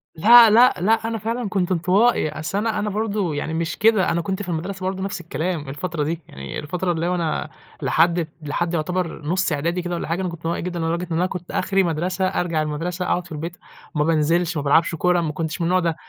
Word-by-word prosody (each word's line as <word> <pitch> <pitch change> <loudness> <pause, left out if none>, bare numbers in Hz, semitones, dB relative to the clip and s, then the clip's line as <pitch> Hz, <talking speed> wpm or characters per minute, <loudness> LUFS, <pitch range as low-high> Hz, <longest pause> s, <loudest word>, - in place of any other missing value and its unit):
لأ 230 +7 +8
لأ 240 +4 +6
لأ، 215 +4 +4
أنا 225 0 -2
فعلًا 225 +1 -3
كنت 190 -3 -1
انطوائي، 185 +3 +3
أصل 155 +4 -4
أنا 215 0 0
أنا 210 0 -1
برضه 205 -5 -1
يعني 155 +2 -3
مش 165 +1 -2
كده، 215 -3 +3
أنا 170 - 0
كنت 190 +3 -3
في 180 - -7
المدرسة 185 +3 -4
برضه 190 0 -2
نفْس 195 -3 -4
الكلام 160 -1 -3
الفترة 155 +2 -3
دي، 160 +3 -3
يعني 70 0 -7
الفترة 175 +4 -2
اللي 165 0 -1
هو 180 - +1
أنا 165 -3 -2 0.3
لحد 170 0 +2
لحد 165 +3 -2
يعتبر 170 +1 -2
نُص 180 +3 0
إعدادي 170 +5 -1
كده 175 0 -3
والّا - - -4
حاجة، 165 +4 -1
أنا 185 - -1
كنت 170 -1 -8
انطوائي 165 - -1
جدًا 175 0 -4
لدرجة 170 +2 -1
إن 160 - 0
أنا 180 - +2
كنت 180 -2 -6
آخري 195 0 +1
مدرسة، 180 +3 -1
أرجع 175 -4 -1
المدرسة 165 +4 -3
أقعد 180 0 0
في 175 - -16
البيت 165 +3 -5 0.4
وما 150 0 +2
بانزلش، 165 +2 +1
ما 145 - -2
بالعبش 165 +4 +3
كورة، 180 +2 +2
ما 155 -2 -2
كنتش 160 +2 -4
من - - +1
النوع 185 +1 +3
ده، 170 -2 0
175 Hz, 230 wpm, -22 LUFS, 160-185 Hz, 0.4 s, لأ